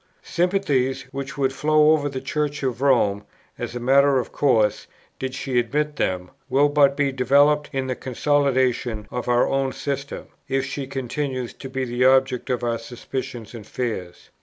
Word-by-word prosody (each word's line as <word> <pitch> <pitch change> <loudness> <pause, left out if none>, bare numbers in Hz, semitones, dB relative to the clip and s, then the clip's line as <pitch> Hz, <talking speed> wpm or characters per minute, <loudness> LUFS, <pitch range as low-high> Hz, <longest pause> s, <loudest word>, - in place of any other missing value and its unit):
Sympathies, 145 -8 0
which 140 +1 -6
would 135 -1 +1
flow 155 +1 +4
over 145 -2 +2
to - - -12
the 130 0 -5
Church 150 0 -2
of 130 -1 -2
Rome, 110 -7 +3 0.4
as - - -5
a - - -3
matter 135 +2 +4
of 125 - -2
course, 110 -7 +2 0.3
did 130 0 -4
she 130 -3 0
admit 150 +5 -1
them, 90 -1 -1 0.2
will 140 +3 +4
but 140 -1 +4
be 145 -2 +2
developed 145 +3 +3
in 135 -2 -2
the 130 - -1
consolidation 130 -4 0
of 125 0 -4
our 120 0 +3
own 135 -1 0
system, 140 0 -4 0.2
if 135 0 0
she 135 0 -5
continues 130 -1 -3
to 135 - -9
be 130 0 -2
the 120 +1 -1
object 130 0 +3
of 125 -1 -1
our 115 -1 0
suspicions 120 0 -6
and 110 -4 -9
fears. 100 -8 -5
135 Hz, 175 wpm, -23 LUFS, 125-140 Hz, 0.4 s, flow